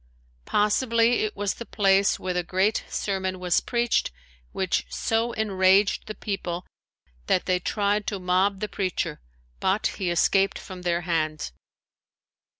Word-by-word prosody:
Possibly 230 Hz, +2 st, +2 dB
it 215 Hz, -, -5 dB
was 200 Hz, -1 st, 0 dB
the -, -, -8 dB
place 195 Hz, -1 st, +3 dB
where 185 Hz, -1 st, -2 dB
the 180 Hz, -, 0 dB
great 190 Hz, +5 st, +1 dB
sermon 190 Hz, -2 st, -2 dB
was 180 Hz, -1 st, +2 dB
preached 240 Hz, -1 st, +1 dB, 0.4 s
which -, -, 0 dB
so 225 Hz, -, 0 dB
enraged 195 Hz, -1 st, +2 dB
the 215 Hz, -, -5 dB
people 180 Hz, -4 st, -4 dB, 0.6 s
that 180 Hz, -, +2 dB
they 180 Hz, -1 st, +1 dB
tried 205 Hz, +2 st, 0 dB
to 205 Hz, -, -1 dB
mob 190 Hz, +2 st, +1 dB
the 210 Hz, -, -1 dB
preacher, 185 Hz, -, -3 dB, 0.4 s
but 190 Hz, +3 st, +1 dB, 0.2 s
he 185 Hz, -, +1 dB
escaped 195 Hz, +3 st, +2 dB
from 185 Hz, -2 st, -9 dB
their 175 Hz, -1 st, 0 dB
hands. 155 Hz, -, -1 dB
195 Hz, 140 wpm, -25 LUFS, 180-210 Hz, 0.6 s, place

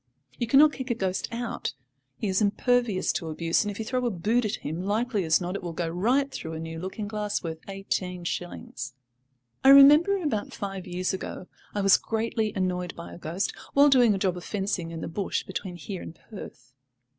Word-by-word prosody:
You 235 Hz, -, 0 dB
cannot 285 Hz, +5 st, +6 dB
kick 260 Hz, 0 st, -6 dB
a 235 Hz, -, +1 dB
ghost 190 Hz, -4 st, -1 dB
out; 230 Hz, -, -3 dB, 0.4 s
he 215 Hz, -, -2 dB
is 190 Hz, +2 st, +1 dB
impervious 220 Hz, -1 st, +2 dB
to 165 Hz, -, -3 dB
abuse, 165 Hz, +4 st, +1 dB
and 205 Hz, -, -3 dB
if 205 Hz, -, -5 dB
you 225 Hz, -, -4 dB
throw 255 Hz, +2 st, -1 dB
a -, -, +2 dB
boot 220 Hz, +5 st, +1 dB
at 210 Hz, -, 0 dB
him, 160 Hz, +4 st, -3 dB
likely 210 Hz, +2 st, 0 dB
as 160 Hz, 0 st, +4 dB
not 180 Hz, +1 st, -3 dB
it -, -, -3 dB
will 175 Hz, -2 st, -5 dB
go 170 Hz, +1 st, -2 dB
right 245 Hz, +12 st, +1 dB
through 160 Hz, -, -6 dB
a 160 Hz, -, -5 dB
new 165 Hz, 0 st, -6 dB
looking 190 Hz, +4 st, -5 dB
glass 210 Hz, -1 st, -2 dB
worth 160 Hz, -1 st, -4 dB
eighteen 185 Hz, -2 st, -3 dB
shillings. 130 Hz, -8 st, -5 dB, 0.7 s
I 270 Hz, -, +7 dB
remember, 295 Hz, +8 st, +8 dB
about 220 Hz, -9 st, -2 dB
five 195 Hz, -2 st, -5 dB
years 180 Hz, +1 st, -1 dB
ago, 185 Hz, -1 st, -5 dB, 0.3 s
I 205 Hz, -, +1 dB
was 195 Hz, -1 st, +6 dB
greatly 220 Hz, -1 st, -1 dB
annoyed 180 Hz, -2 st, -1 dB
by 170 Hz, -, -9 dB
a -, -, -10 dB
ghost, 175 Hz, +5 st, -2 dB, 0.2 s
while 285 Hz, +1 st, +7 dB
doing 245 Hz, -6 st, +5 dB
a -, -, -1 dB
job 185 Hz, -2 st, 0 dB
of 175 Hz, -, -7 dB
fencing 195 Hz, -4 st, -2 dB
in 165 Hz, -1 st, -6 dB
the -, -, -4 dB
bush 190 Hz, +4 st, -2 dB
between 185 Hz, -1 st, -5 dB
here 175 Hz, +2 st, -6 dB
and 165 Hz, -, -8 dB, 0.2 s
Perth. 130 Hz, -, -10 dB
195 Hz, 210 wpm, -27 LUFS, 175-225 Hz, 0.7 s, remember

